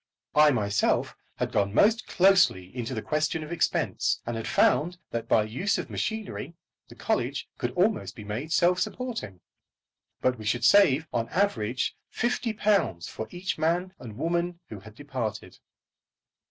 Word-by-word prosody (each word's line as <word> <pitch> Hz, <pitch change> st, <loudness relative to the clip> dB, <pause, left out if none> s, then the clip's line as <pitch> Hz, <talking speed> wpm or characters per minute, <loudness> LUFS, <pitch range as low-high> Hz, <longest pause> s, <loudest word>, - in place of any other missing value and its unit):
I 150 Hz, 0 st, +6 dB
myself 100 Hz, -6 st, +1 dB, 0.2 s
had -, -, -2 dB
gone 100 Hz, 0 st, 0 dB
most 225 Hz, -, +4 dB
closely 175 Hz, -, +3 dB
into 125 Hz, +1 st, -4 dB
the 110 Hz, -, -4 dB
question 155 Hz, +1 st, -1 dB
of 155 Hz, -, -9 dB
expense, 175 Hz, -, 0 dB
and 120 Hz, -, -3 dB
had 115 Hz, -, -4 dB
found 175 Hz, +4 st, +2 dB
that 115 Hz, -1 st, -3 dB
by 110 Hz, -, +4 dB
the 110 Hz, -, -8 dB
use 185 Hz, -, 0 dB
of -, -, -5 dB
machinery 220 Hz, -5 st, -4 dB, 0.3 s
the -, -, -12 dB
college -, -, -1 dB
could -, -, -1 dB
almost 95 Hz, -1 st, +1 dB
be 105 Hz, -, -9 dB
made 115 Hz, +10 st, -5 dB
self 180 Hz, +2 st, +3 dB
supporting. 220 Hz, -, -4 dB, 0.8 s
But 125 Hz, -2 st, 0 dB
we 110 Hz, -, -8 dB
should 120 Hz, +3 st, 0 dB
save 160 Hz, -3 st, +5 dB
on 115 Hz, -1 st, 0 dB
an -, -, -16 dB
average 130 Hz, -, 0 dB, 0.2 s
£50 210 Hz, -, 0 dB
for 110 Hz, -, -6 dB
each 180 Hz, -2 st, -4 dB
man 175 Hz, +4 st, 0 dB
and 110 Hz, -4 st, -9 dB
woman 170 Hz, +3 st, -1 dB
who 105 Hz, -, -7 dB
had 105 Hz, +2 st, -14 dB
departed. 125 Hz, -7 st, -5 dB
145 Hz, 160 wpm, -27 LUFS, 110-180 Hz, 0.8 s, I